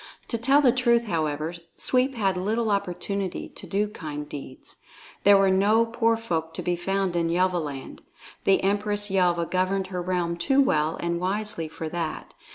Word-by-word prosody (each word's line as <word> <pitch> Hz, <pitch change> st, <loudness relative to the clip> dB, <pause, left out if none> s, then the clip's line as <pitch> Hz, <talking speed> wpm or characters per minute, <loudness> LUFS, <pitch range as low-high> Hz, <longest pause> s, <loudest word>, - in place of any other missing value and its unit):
To 230 Hz, -, -1 dB
tell 275 Hz, +5 st, +4 dB
the 255 Hz, -, +6 dB
truth, 235 Hz, -2 st, +2 dB
however, 155 Hz, -3 st, -2 dB, 0.2 s
Sweep 260 Hz, +1 st, +2 dB
had 195 Hz, -5 st, +1 dB
little 215 Hz, +4 st, 0 dB
opportunity 200 Hz, 0 st, -2 dB
to -, -, -10 dB
do 205 Hz, +2 st, 0 dB
kind 150 Hz, -7 st, -7 dB
deeds. 135 Hz, -3 st, -9 dB, 0.5 s
There 200 Hz, 0 st, +8 dB
were 195 Hz, -1 st, +4 dB
no 210 Hz, +4 st, +4 dB
poor 230 Hz, 0 st, +1 dB
folk 165 Hz, -7 st, -3 dB
to -, -, -4 dB
be 175 Hz, -, 0 dB
found 190 Hz, +1 st, -1 dB
in 170 Hz, -1 st, +1 dB
Yelvaland. 170 Hz, -6 st, -1 dB, 0.5 s
The 195 Hz, -1 st, +3 dB
Empress 205 Hz, +1 st, +1 dB
Yelva 175 Hz, -3 st, +2 dB
governed 185 Hz, +2 st, 0 dB
her 180 Hz, -, -2 dB
realm 175 Hz, -1 st, -1 dB
too 270 Hz, +11 st, +2 dB
well 155 Hz, -, +2 dB
and 170 Hz, 0 st, -2 dB
wisely 200 Hz, -1 st, -2 dB
for 160 Hz, +1 st, -6 dB
that. 165 Hz, -2 st, -4 dB
190 Hz, 165 wpm, -25 LUFS, 170-210 Hz, 0.5 s, There